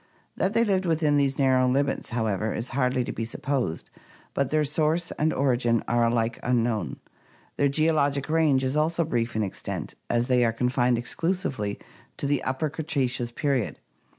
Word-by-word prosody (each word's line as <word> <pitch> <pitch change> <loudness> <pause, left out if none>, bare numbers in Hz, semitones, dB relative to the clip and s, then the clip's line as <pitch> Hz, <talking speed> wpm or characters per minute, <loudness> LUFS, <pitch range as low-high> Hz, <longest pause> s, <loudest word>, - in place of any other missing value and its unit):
That 195 +3 0
they 230 - +5
lived 195 -4 +1
only 165 - +3
within 150 -2 +2
these 140 -1 +1
narrow 130 -2 +3
limits, 140 +2 0
however, 110 -3 -1
is 115 +3 -3
hardly 125 -1 +1
to - - -4
be 115 - -4
supposed; 130 - -3 0.4
but 140 -2 0
their 155 0 +2
source 155 +4 +1
and 155 +1 0
origin 120 -4 +1
are 120 0 +2
alike 115 0 0
unknown. 120 -3 0 0.6
Their 140 - +3
geologic 145 -2 +1
range 155 -4 +3
is 130 +2 0
also 165 +2 +1
brief 120 -6 -1
in 110 - +1
extent, 95 - -5 0.2
as 120 0 +2
they 125 -1 +3
are 115 -1 +2
confined 125 0 +1
exclusively 130 - -2 0.4
to - - -2
the 140 -1 +1
Upper 130 +4 -1
Cretaceous 130 -6 -1
period. 135 -2 -1
130 Hz, 170 wpm, -26 LUFS, 120-150 Hz, 0.6 s, they